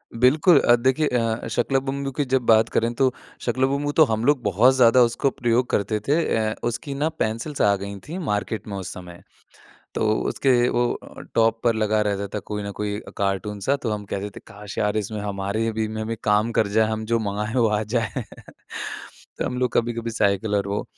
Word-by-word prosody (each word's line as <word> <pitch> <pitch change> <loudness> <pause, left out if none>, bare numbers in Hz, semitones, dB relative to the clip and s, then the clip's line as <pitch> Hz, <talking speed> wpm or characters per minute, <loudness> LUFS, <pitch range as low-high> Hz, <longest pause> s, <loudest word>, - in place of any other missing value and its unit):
बिल्कुल 145 +7 +5
अ, 120 - +5
देखिए 130 +5 +1
अ, 115 -2 -1
शाका 120 +4 -1
Laka 135 0 +2
boom 140 +1 -3
boom 135 - -3
की 145 - +1
जब 130 - +4
बात 110 0 +5
करें 115 +1 0
तो 130 -1 +3 0.3
शाका 125 +1 -2
लाका 130 - +4
बूम 140 +1 -1
बूम 145 - 0
तो 160 - +6
हम 110 +1 0
लोग 145 -3 +3
बहुत 110 +7 +4
ज़्यादा 125 -1 +6
उसको 120 +3 +1
प्रयोग 120 0 0
करते 105 +1 0
थे। 145 - +3 0.2
अ, 110 0 0
उसकी 140 +4 -4
ना 150 +3 0
पेंसिल्स 115 +7 -2
आ 100 -1 +4
गईं 100 0 -6
थीं 175 +5 -5
मार्केट 105 - -2
में 100 - -5
उस 95 - -5
समय। 90 -1 -11 0.7
तो 110 - +1 0.2
उसके 135 -2 +1 0.2
वो 120 0 0 0.4
टॉप 115 0 +3
पर 115 -1 +3
लगा 110 0 +1
रहता 100 -1 -1
था - - 0
कोई 105 -1 -4
ना 100 - -4
कोई 105 0 -2 0.2
कार्टून 100 +1 -2
सा 140 +8 +1
तो 115 - -1
हम 105 -1 -3
कहते 100 +1 -4
थे - - -8
काश 100 0 -10
यार 105 0 +1
इसमें 105 0 -3
हमारे 100 +2 -2
भी 110 0 -1
में 110 0 -4
भी 115 0 -3
काम 105 +2 +2
कर 110 - +2
जाए 110 -1 +5
हम 110 0 -3
जो 115 - +4
मँगाएँ 105 +2 -3
वो 115 - +4
आ 105 0 0
जाए। 110 -1 -2 1.2
तो - - -1
हम 125 - -3
लोग 125 -1 0
कभी-कभी 115 0 0
साइकिल 105 -1 +1
और 100 - 0
वो 100 - -2
110 Hz, 220 wpm, -23 LUFS, 105-125 Hz, 1.2 s, तो